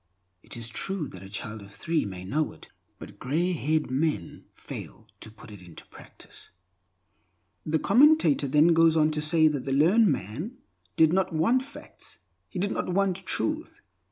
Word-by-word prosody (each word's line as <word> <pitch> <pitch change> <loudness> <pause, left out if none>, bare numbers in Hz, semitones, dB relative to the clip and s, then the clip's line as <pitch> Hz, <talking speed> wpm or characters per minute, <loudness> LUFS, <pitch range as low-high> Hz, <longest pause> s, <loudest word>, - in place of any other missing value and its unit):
It - - -8
is 115 -1 -3
true 170 - -3
that 90 - -11
a 95 - -11
child 105 +1 -6
of 100 0 -13
three 165 +7 -1
may 95 -2 -7
know 150 +10 -1
it, - - -16 0.3
but - - -12
grey 165 +8 0
haired 155 0 0
old - - -11
men 135 - -2
fail - - -9
to - - -7
put 110 0 -15
it 100 -3 -12
into 85 -2 -13
practice." - - -15 1.2
The 155 +1 +2
commentator 290 - +4
then 150 +5 +4
goes 165 0 +4
on 155 0 +3
to 150 0 -2
say 155 +1 +4
that 145 -4 -4
the 135 - -3
learned 175 +11 +4
man 145 - -3 0.4
did 160 0 +4
not 190 0 +1
want 230 +12 +2
facts; 280 +2 -12 0.3
he - - -8
did 200 +3 -1
not - - -3
want 190 -1 +1
Truth. 315 +1 -3
155 Hz, 180 wpm, -27 LUFS, 120-185 Hz, 1.2 s, commentator